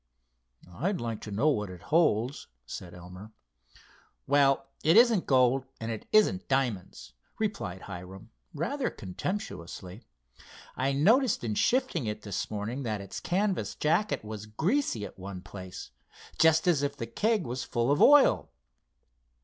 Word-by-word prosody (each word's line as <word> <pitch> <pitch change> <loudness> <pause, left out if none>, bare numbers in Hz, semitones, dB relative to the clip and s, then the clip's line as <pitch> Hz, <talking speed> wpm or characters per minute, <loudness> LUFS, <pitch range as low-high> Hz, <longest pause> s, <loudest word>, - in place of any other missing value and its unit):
"I'd 170 - -2
like 115 -2 -4
to 105 - -8
know 120 +10 +2
what 105 -8 -1
it 90 -1 -11
holds," 140 -5 +1 0.2
said 85 +8 -8
Elmer. 90 +5 -11 0.9
"Well, 140 -1 +3 0.2
it 160 +6 +5
isn't 230 -5 +5
gold 130 0 +3
and 115 0 -4
it 110 - -6
isn't 210 -3 +3
diamonds," 105 - -2 0.2
replied 200 - -3
Hiram, 95 +5 -9 0.2
rather 245 - -2
contemptuously. 95 - -6 0.7
"I 135 +1 0
noticed 215 - +3
in 110 -2 -1
shifting 240 - +1
it 105 0 -4
this 100 -3 -3
morning 110 +6 -4
that 110 -5 -2
its 100 -1 -7
canvas 190 +1 -1
jacket 165 - 0
was 105 -1 -7
greasy 160 - 0
at 95 - -12
one 95 -1 -7
place, 95 -6 -9 0.5
just 160 +1 +4
as 165 -5 +3
if 145 0 -2
the 115 - -4
keg 210 - 0
was 125 +1 -4
full 120 +2 0
of 145 - +2
oil." 290 -1 +6
125 Hz, 140 wpm, -29 LUFS, 100-170 Hz, 0.9 s, oil